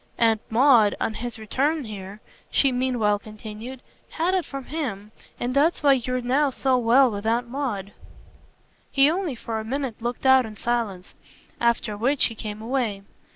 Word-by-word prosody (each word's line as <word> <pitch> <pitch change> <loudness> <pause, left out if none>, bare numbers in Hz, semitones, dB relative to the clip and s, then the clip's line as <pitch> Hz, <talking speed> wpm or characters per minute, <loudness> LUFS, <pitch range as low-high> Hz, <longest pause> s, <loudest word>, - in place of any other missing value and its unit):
"Aunt 225 -2 +3
Maud, 230 -3 +5
on 220 - -1
his 240 +2 -4
return 275 +7 -1
here," 205 -1 -8 0.3
she 275 - +3
meanwhile 245 -5 +1
continued, 215 +4 -9 0.3
"had 340 +3 0
it 370 -3 +1
from 275 -1 -6
him. 220 -10 -4 0.3
And 245 +1 -2
that's 300 +5 +2
why 280 -1 +6
you're 255 0 -1
now 270 +4 +2
so 265 0 +1
well 245 +2 +5
with 205 +1 -4
Aunt 235 +2 +1
Maud." 235 -7 -4 1.0
He 275 +2 +5
only 345 -6 -2
for 225 -1 -4
a - - -5
minute 255 -1 -4
looked 240 +2 -4
out 265 0 +6
in 215 - -10
silence 220 -5 -2 0.5
after 235 -2 +1
which 255 +7 +2
he 230 - 0
came 215 0 -7
away. 230 -5 -1
240 Hz, 165 wpm, -24 LUFS, 215-270 Hz, 1.0 s, why